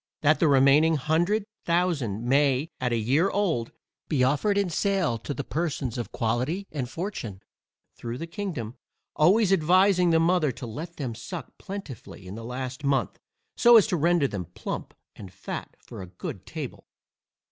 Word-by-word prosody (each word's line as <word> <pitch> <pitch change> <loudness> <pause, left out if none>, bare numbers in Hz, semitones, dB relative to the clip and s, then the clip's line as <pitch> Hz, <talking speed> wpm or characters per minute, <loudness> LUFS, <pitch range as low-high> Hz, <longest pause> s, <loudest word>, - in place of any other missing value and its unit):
That 155 +1 +4
the 165 - +4
remaining 140 +3 +5
hundred 170 +8 +1 0.2
thousand 160 - 0
may, 140 +2 +2
at 125 -1 -1
a 120 - +1
year 135 - +2
old, 170 - 0 0.4
be 135 -5 +1
offered 145 +10 +2
in 200 -1 +2
sale 180 - 0
to 115 - -6
the 140 - -3
persons 150 -7 -2
of 120 -3 -4
quality 130 - -1
and 130 -5 -3
fortune, 125 - -5 0.5
through 120 0 -5
the 165 - -5
kingdom, 165 - -5 0.4
always 195 +5 +4
advising 185 +1 +4
the 165 -1 +4
mother 165 -3 +3
to 125 +1 -8
let 155 +10 -7
them 130 -6 -4
suck 135 - -8
plentifully 160 - -8
in 90 - -8
the 115 +2 -7
last 130 +3 -5
month, 135 -8 0 0.4
so 240 0 +7
as 215 - +6
to 210 - 0
render 170 -2 +3
them 100 -7 -5
plump, 90 - -6 0.2
and 95 -3 -10
fat - - -7
for - - -10
a 90 - -8
good 90 0 -8
table. - - -7
150 Hz, 170 wpm, -26 LUFS, 120-175 Hz, 0.5 s, so